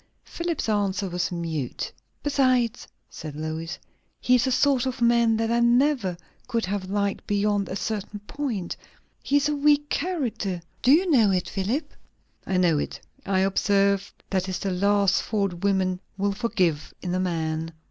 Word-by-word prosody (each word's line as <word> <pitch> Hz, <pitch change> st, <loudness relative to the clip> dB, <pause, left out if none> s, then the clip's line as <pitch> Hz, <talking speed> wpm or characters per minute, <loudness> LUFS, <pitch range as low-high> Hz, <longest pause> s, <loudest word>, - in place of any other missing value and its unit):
Philip's 340 Hz, -5 st, -3 dB
answer 205 Hz, -2 st, 0 dB
was 180 Hz, 0 st, -2 dB
mute. 165 Hz, -7 st, -3 dB, 0.3 s
"Besides," 255 Hz, -4 st, +1 dB, 0.2 s
said 155 Hz, -2 st, -8 dB
Lois, 160 Hz, +2 st, -4 dB, 0.4 s
"he 250 Hz, -, +2 dB
is 250 Hz, +1 st, +4 dB
a -, -, +1 dB
sort 265 Hz, -1 st, +3 dB
of 255 Hz, -, -3 dB
man 235 Hz, -1 st, +4 dB
that 225 Hz, 0 st, 0 dB
I 235 Hz, -, +3 dB
never 235 Hz, -5 st, +3 dB, 0.3 s
could 230 Hz, -3 st, 0 dB
have 190 Hz, 0 st, -3 dB
liked 200 Hz, 0 st, -1 dB
beyond 205 Hz, -1 st, +1 dB
a 190 Hz, -, -3 dB
certain 210 Hz, 0 st, -3 dB
point. 215 Hz, -6 st, -4 dB, 0.5 s
He 285 Hz, -, +2 dB
is 285 Hz, -, +2 dB
a 300 Hz, -, 0 dB
weak 295 Hz, 0 st, +3 dB
character; 260 Hz, -, -1 dB, 0.2 s
do 255 Hz, -, +4 dB
you 350 Hz, +6 st, +5 dB
know 230 Hz, -8 st, +5 dB
it, 185 Hz, -2 st, 0 dB
Philip?" 215 Hz, +11 st, -2 dB, 0.5 s
"I 190 Hz, -, +1 dB
know 170 Hz, -4 st, +3 dB
it. -, -, -4 dB, 0.3 s
I 190 Hz, -1 st, +2 dB
observe, 200 Hz, 0 st, +2 dB, 0.2 s
that 190 Hz, -1 st, 0 dB
is 185 Hz, -, -2 dB
the 195 Hz, +1 st, -2 dB
last 200 Hz, +1 st, +3 dB
fault 200 Hz, -4 st, -1 dB
women 190 Hz, -2 st, +1 dB, 0.2 s
will 200 Hz, +1 st, +1 dB
forgive 185 Hz, -9 st, -1 dB
in 180 Hz, -1 st, -2 dB
a 185 Hz, -, 0 dB
man." 165 Hz, -3 st, -2 dB
200 Hz, 165 wpm, -25 LUFS, 185-240 Hz, 0.5 s, you